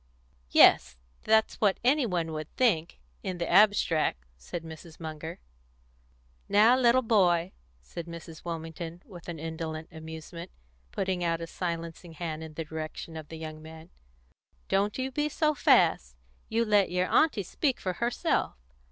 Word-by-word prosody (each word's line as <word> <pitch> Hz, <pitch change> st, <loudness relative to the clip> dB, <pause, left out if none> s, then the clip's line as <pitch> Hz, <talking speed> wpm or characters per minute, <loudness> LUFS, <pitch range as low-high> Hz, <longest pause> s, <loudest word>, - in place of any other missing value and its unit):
"Yes, 65 Hz, +1 st, +6 dB, 0.3 s
that's 220 Hz, 0 st, +2 dB
what 200 Hz, -3 st, +3 dB
any 265 Hz, +1 st, +3 dB
one 170 Hz, -4 st, -1 dB
would 155 Hz, 0 st, -5 dB
think 185 Hz, -11 st, +1 dB, 0.2 s
in 185 Hz, -, -4 dB
the 170 Hz, -1 st, -2 dB
abstract," 165 Hz, -, +3 dB
said 115 Hz, -, -7 dB
Mrs. 160 Hz, 0 st, -11 dB
Munger. 160 Hz, 0 st, -6 dB, 1.1 s
"Now, 215 Hz, +5 st, +6 dB
little 255 Hz, 0 st, +4 dB
boy," 185 Hz, -6 st, +3 dB, 0.3 s
said 170 Hz, -1 st, -8 dB
Mrs. 165 Hz, -1 st, -10 dB
Wilmington, 165 Hz, +1 st, -6 dB
with 175 Hz, -4 st, -11 dB
indolent 160 Hz, -1 st, -5 dB
amusement, 160 Hz, +2 st, -9 dB, 0.4 s
putting 185 Hz, -2 st, -1 dB
out 165 Hz, -1 st, 0 dB
a 165 Hz, -, -4 dB
silencing 170 Hz, 0 st, -5 dB
hand 160 Hz, -1 st, -5 dB
in 155 Hz, -1 st, -10 dB
the 165 Hz, +1 st, -4 dB
direction 160 Hz, +1 st, -6 dB
of 155 Hz, -2 st, -7 dB
the 160 Hz, -, -8 dB
young 155 Hz, -1 st, -7 dB
man, 160 Hz, +1 st, -12 dB, 0.8 s
"don't 200 Hz, +2 st, +1 dB
you 260 Hz, 0 st, -2 dB
be 295 Hz, +3 st, -1 dB
so 305 Hz, 0 st, +1 dB
fast. 60 Hz, -, +3 dB, 0.3 s
You 230 Hz, +1 st, +1 dB
let 205 Hz, -3 st, +3 dB
your 180 Hz, +1 st, +1 dB
aunty 240 Hz, -2 st, +3 dB
speak 265 Hz, -, -1 dB
for 185 Hz, -, -2 dB
herself. 235 Hz, +6 st, 0 dB
170 Hz, 145 wpm, -28 LUFS, 160-205 Hz, 1.1 s, Yes